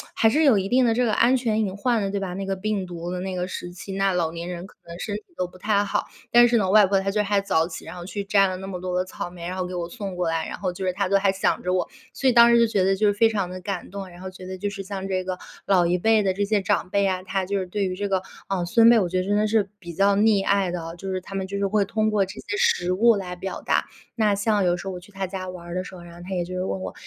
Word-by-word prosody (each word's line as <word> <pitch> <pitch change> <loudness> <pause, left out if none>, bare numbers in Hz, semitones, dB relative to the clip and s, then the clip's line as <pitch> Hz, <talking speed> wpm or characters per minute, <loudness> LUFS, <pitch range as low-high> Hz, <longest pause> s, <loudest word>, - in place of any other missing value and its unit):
还 225 - +4
是 305 +7 +2
有 270 -8 +6
一 195 0 0
定 255 +4 +3
的 230 - +3
这 245 +2 +2
个 220 - +1
安 240 +4 +4
全 220 -3 0
隐 195 -3 -1
患 230 +1 +1
的， 195 - -2
对 200 - -1
吧？ 190 -2 -4
那 195 +1 -4
个 195 0 -2
病 205 -1 -2
毒 175 -1 -6
的 180 0 -3
那 190 0 -4
个 180 0 -2
时 175 -1 -6
期， 180 +2 -8
那 195 0 +1
老 170 -3 0
年 170 +1 -5
人 180 +1 -6
可 - - -20
能 170 0 -9
身 205 +1 -3
体 210 - -5 0.2
都 180 - -1
不 180 - -16
太 205 +1 +1
好。 - - -1 0.2
但 240 0 +7
是 240 0 +3
呢， 195 -4 +1
外 210 +1 +7
婆 195 0 +2
她 195 +1 -1
就 210 +1 +1
还 205 0 +2
早 165 -5 +1
起， 160 - -8
然 - - -8
后 175 - -8
去 200 +2 -4
摘 200 -1 +4
了 185 -1 -3
那 190 +1 -7
么 180 -2 -5
多 180 -1 -2
的 180 - 0
草 185 - -6
莓， 175 -1 -8
然 180 - -4
后 185 - -1
给 180 - -6
我 170 -1 -3
送 195 -1 -6
过 180 - 0
来， 165 0 -1
然 - - -6
后 185 -2 -2
就 190 - -5
是 185 - +2
她 195 +1 -1
都 200 +1 +3
还 195 -1 +2
想 190 - 0
着 180 0 0
我， 180 - 0 0.3
所 265 - +2
以 - - +3
当 235 0 +7
时 235 - +6
就 230 - +5
觉 205 -4 +1
得 195 +1 +3
就 210 +1 +3
是 205 - +3
非 225 +2 +4
常 200 -5 -1
地 185 0 -7
感 190 -1 -4
动。 195 -1 -7
然 175 - -14
后 190 - -6
觉 185 0 -11
得 185 0 -6
就 205 +2 -2
是 200 -1 -6
像 195 0 -5
这 185 -1 -1
个 185 0 -4 0.3
老 185 -3 +4
一 175 +1 +2
辈 220 +4 +3
的 190 -2 +1
这 200 +2 -1
些 205 0 +1
长 185 - 0
辈 200 +1 +2
啊， 185 -1 -1
她 190 0 -2
就 200 +1 -1
是 185 - -3
对 200 +2 -2
于 185 -1 -2
这 200 +1 -3
个， 190 -1 +1 0.3
啊， 185 -3 -1
孙 230 +6 +6
辈， 235 -1 +6
我 190 - +1
觉 185 - -1
得 185 - 0
真 205 +2 +1
的 215 - +2
是 210 -2 +1
比 170 -3 -8
较 195 +3 +3
溺 210 -2 +4
爱 195 -2 +2
的 175 -1 -3
哦， 165 0 -6
就 195 - -6
是 185 0 -2
她 195 - -11
们 190 -1 -2
就 200 +1 -4
是 200 - 0
会 205 0 +2
通 215 +2 0
过 205 -2 +2
这 190 - -9
些 405 - -4
食 180 - +2
物 230 +5 +5
来 180 -3 -4
表 190 +2 -5
达。 - - +1 0.3
那 210 -3 +2
像 205 -1 +1
有 175 0 +3
时 175 - -8
候 190 - -3
我 180 - -6
去 190 +3 -17
她 195 0 -3
家 185 0 -5
玩 180 -1 -9
儿 175 - -6
的 185 - -1
时 185 - -10
候， 175 - -11
然 170 0 -12
后 175 - -12
她 190 - -4
也 175 - 0
就 180 +1 -6
是 185 - -1
问 190 - -3
我 - - -5
195 Hz, 370 characters per minute, -24 LUFS, 180-205 Hz, 0.3 s, 但